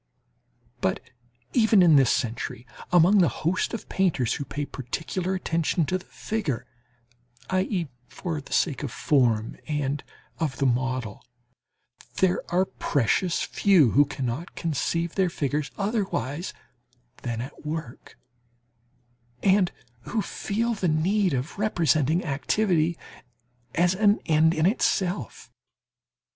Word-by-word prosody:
But - - 0 0.5
even 220 -5 +5
in 165 -3 +6
this 135 -3 +5
century, 115 0 -2 0.3
among 180 +4 +6
the 175 - +5 0.2
host 180 +3 +1
of 230 - -6
painters 165 -11 +1
who 140 - -4
pay 145 +1 -4
particular 160 +9 -3
attention 170 -2 0
to 185 +5 -1
the - - -17
figure, 160 - -3 0.9
i.e., 185 -2 0 0.2
for 165 -5 -4
the - - -16
sake 145 -7 +1
of 140 -5 -4
form 115 -6 +1
and 145 -2 -1 0.4
of 150 -5 -1
the 140 - +1
model, 130 -3 -1 0.9
there 185 -1 +2
are 180 +2 +3
precious 165 - 0
few 180 - +4
who 145 +1 +5
cannot 135 +3 -4
conceive 165 +1 -1
their 190 -2 +2
figures 150 -2 -2
otherwise 195 - -2 0.7
than 120 -2 -4
at 130 +6 -8
work, 150 -5 -6 1.3
and 190 -2 +4 0.3
who 220 -3 -1
feel 230 +3 -2
the 195 -4 -1
need 180 +3 +2
of 135 +9 -4
representing 165 -5 +2
activity 160 +3 +1 0.8
as 175 +2 +3
an 205 +1 +4
end 160 +1 +4
in 155 - +2
itself. 190 -2 0
165 Hz, 120 wpm, -26 LUFS, 140-185 Hz, 1.3 s, in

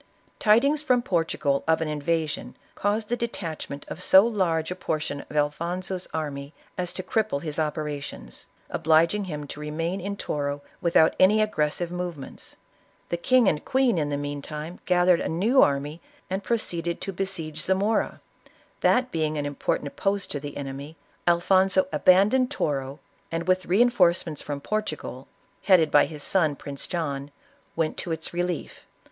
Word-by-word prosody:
Tidings 275 +8 +4
from 250 -5 +2
Portugal 165 - 0
of 160 0 +3
an 160 - -1
invasion, 155 +1 -2 0.2
caused 210 +1 -1
the 240 - +1
de 235 0 -1
tachment 155 -8 -6
of 175 - -7
so 190 +2 +7
large 180 -8 0
a - - -2
portion 155 -5 -3
of 150 - -5
Alfonso's 175 +5 -1
army 145 -2 -4 0.2
as 180 -1 -2
to 185 - -5
cripple 215 -11 -1
his 155 -1 -3
operations, 150 - -4 0.2
obliging 165 +6 +3
him 150 -5 -5
to 145 - -8
remain 165 +5 -3
in 200 +2 -4
Toro 145 -3 -3 0.2
without 165 -2 +4
any 205 +3 +6
aggressive 170 -5 0
movements. 175 -5 -6 0.5
The 170 - -1
king 250 +5 +4
and 150 - +1
queen 255 -8 +2
in 145 -1 -1
the 145 - -1
meantime 150 +3 -5
gathered 180 -1 +4
a - - -2
new 215 +11 +3
army 145 +3 +1 0.3
and 190 +1 -2
pro 235 - +1
ceeded 170 -5 -3
to 195 - -4
besiege 175 -5 -2
Zainora. 195 +5 0 0.6
That 255 0 +3
being 155 -2 -1
an 145 - -2
important 145 0 -2
post 195 -1 0
to 145 - -3
the 145 0 -7
enemy, 140 +2 -6 0.3
Alfonso 190 +8 +4
abandoned 210 +8 +4
Toro, 140 - -2 0.3
and 165 +1 -3
with 185 0 +2
reinforcements 180 -7 +3
from 145 -1 -5
Portugal, 155 - -4 0.4
headed 175 -6 +5
by 145 - +6
his 150 -3 -8
son 160 -6 +2
Prince 140 0 -5
John, 145 -5 -3 0.5
went 160 -1 -1
to 175 - -3
its 160 +1 -3
relief. 175 -1 -3
170 Hz, 155 wpm, -26 LUFS, 150-195 Hz, 0.6 s, so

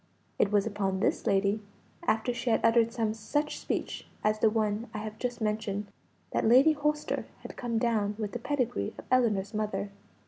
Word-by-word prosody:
It 200 - +3
was 205 -1 +3
upon 195 -3 -1
this - - 0
lady, 200 +2 +2 0.5
after 225 +3 +2
she 240 - -2
had 225 - +2
uttered 230 0 +4
some 225 -3 0
such 290 +8 -2
speech - - -3 0.2
as 215 0 +2
the 220 - +5
one 215 +1 0
I - - -1
have 215 0 -6
just 245 -1 -2
mentioned, 210 -1 -1 0.5
that - - 0
Lady 260 +7 +7
Holster 300 0 -1 0.2
had - - -8
come 235 -2 -2
down 220 -3 +1
with 210 -2 -3
the 240 - -4
pedigree 240 - -1
of - - -10
Ellinor's 220 -5 +2
mother. 210 -1 -2
220 Hz, 180 wpm, -29 LUFS, 210-240 Hz, 0.5 s, Lady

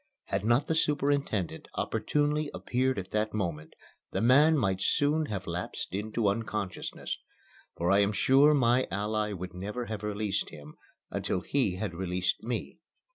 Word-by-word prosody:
Had - - 0
not 120 +6 +3
the 160 - 0
superintendent 140 - 0
opportunely 150 0 0
appeared 130 +1 0
at 95 -1 -5
that 110 0 0
moment, 85 -7 -3 0.3
the - - -2
man 145 +7 +6
might 95 -7 +1
soon 150 +6 +2
have 100 -3 -4
lapsed 85 +1 -4
into 105 +2 -1
unconsciousness, 105 -2 -3 0.6
for 85 +2 +1
I 100 - +5
am 100 0 +3
sure 140 +7 +5
my 125 -1 +3
ally 105 +1 -1
would 90 -2 -6
never 105 +7 -4
have 110 -3 -5
released 105 -2 -1
him 75 0 -11 0.4
until 90 - -1
he 105 -3 0
had 95 -1 -3
released 90 +1 -1
me. 120 +1 -4
105 Hz, 150 wpm, -29 LUFS, 95-130 Hz, 0.6 s, man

